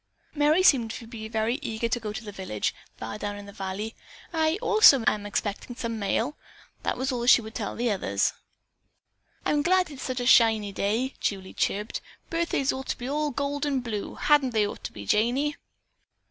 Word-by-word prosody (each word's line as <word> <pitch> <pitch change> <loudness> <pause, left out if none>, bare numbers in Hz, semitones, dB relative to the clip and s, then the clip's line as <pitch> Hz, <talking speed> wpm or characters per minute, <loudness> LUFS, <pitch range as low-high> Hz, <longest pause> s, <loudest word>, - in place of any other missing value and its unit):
Merry 305 +4 +3
seemed 245 -10 +5
to 230 +1 -7
be 225 -1 -7
very 220 +4 -1
eager 235 -3 -2
to 235 +1 -1
go 215 -2 -4
to 225 +3 -6
the 210 - -7
village, 185 - -2 0.2
far 110 - -6
down 205 -1 -4
in 205 - -9
the 200 - -11
valley. 195 +4 -4 0.4
"I, 320 +1 +2
also, 430 - +6
am 205 -1 +1
expecting 205 +4 -3
some 230 -2 -4
mail," 230 +7 0 0.5
was 265 +2 -1
all 250 - -2
that 240 - -2
she 250 - +8
would 220 +1 -9
tell 220 -4 -4
the 235 0 0
others. 200 - 0 1.1
"I'm 295 - +2
glad 365 +1 +2
it's 275 - -9
such 255 -1 -3
a - - -2
shiny 220 -4 +5
day," 220 +7 -1
Julie 190 -2 -3
chirped. 210 +2 -1 0.3
"Birthdays 330 -5 +1
ought 265 +1 -6
to - - -2
be 245 - -6
all 300 +2 0
gold 285 +1 -2
and 275 -4 0
blue, 215 -4 -4
hadn't 290 -4 +3
they 215 -2 +3
ought 205 - -6
to - - -4
be, 100 -1 -9
Janey?" 250 - +2
235 Hz, 195 wpm, -27 LUFS, 210-280 Hz, 1.1 s, she